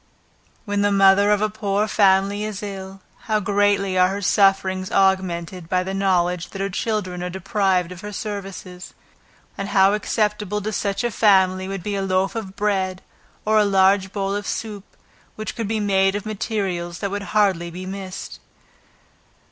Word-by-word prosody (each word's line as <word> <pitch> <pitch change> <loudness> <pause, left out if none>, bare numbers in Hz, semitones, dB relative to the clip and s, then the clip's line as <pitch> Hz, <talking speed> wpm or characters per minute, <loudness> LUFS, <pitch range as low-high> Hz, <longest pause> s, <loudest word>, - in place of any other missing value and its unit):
When 205 -1 -1
the 205 0 +2
mother 195 +1 +5
of 210 0 +3
a 215 - +1
poor 205 -1 -1
family 200 0 +3
is 215 -1 -5
ill, 195 -1 -7 0.2
how 215 -1 +1
greatly 200 -2 +1
are 180 - +6
her 195 +2 -3
sufferings 190 -1 +2
augmented 185 -3 0
by 185 0 +1
the 190 +1 -4
knowledge 180 -3 +1
that 195 - -8
her 195 0 -2
children 185 -3 -2
are 180 - -3
deprived 190 -1 0
of 180 -1 -9
her 210 - -6
services; 195 -3 -7 0.6
and 195 0 -3
how 195 0 +4
acceptable 210 -1 -1
to 215 +1 -3
such 200 +2 -1
a 240 - 0
family 190 -3 +3
would 195 -2 -5
be 205 - -3
a 195 - -1
loaf 190 0 0
of 205 -5 -6
bread, 190 -3 -1 0.4
or 215 0 +4
a - - +5
large 190 -1 +3
bowl 200 -1 -2
of 205 0 -4
soup, 210 -3 -4 0.5
which 215 - -5
could 225 -3 -3
be 220 +1 -1
made 195 -1 +2
of 205 - -4
materials 195 -5 -3
that 200 +2 -3
would 205 0 -3 0.2
hardly 185 -5 +2
be 180 +2 -8
missed. 190 -1 -7
195 Hz, 170 wpm, -22 LUFS, 185-205 Hz, 0.6 s, are